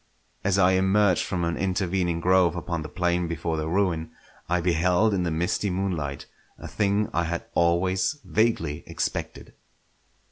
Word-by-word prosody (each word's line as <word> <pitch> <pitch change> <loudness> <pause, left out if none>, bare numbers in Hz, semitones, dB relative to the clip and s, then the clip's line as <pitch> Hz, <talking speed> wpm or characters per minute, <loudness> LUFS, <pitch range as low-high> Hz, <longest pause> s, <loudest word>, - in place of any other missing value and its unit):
As 100 -1 +2
I 95 -1 +5
emerged 95 0 +3
from 90 -3 -2
an 85 0 0
intervening 90 -2 0
grove 90 -1 +3
upon 85 -1 -3
the 75 - -7
plain 90 0 0
before 85 0 -2
the 80 0 -2
ruin, 85 -3 0 0.4
I 90 +1 +2
beheld 90 +5 +2
in 95 - 0
the 90 - 0
misty 90 +5 -1
moonlight 90 -7 -3 0.3
a - - -8
thing 105 0 0
I 85 - +1
had 85 +1 -3
always 90 - +1
vaguely 95 -10 0
expected. - - -4
90 Hz, 150 wpm, -25 LUFS, 85-95 Hz, 0.4 s, I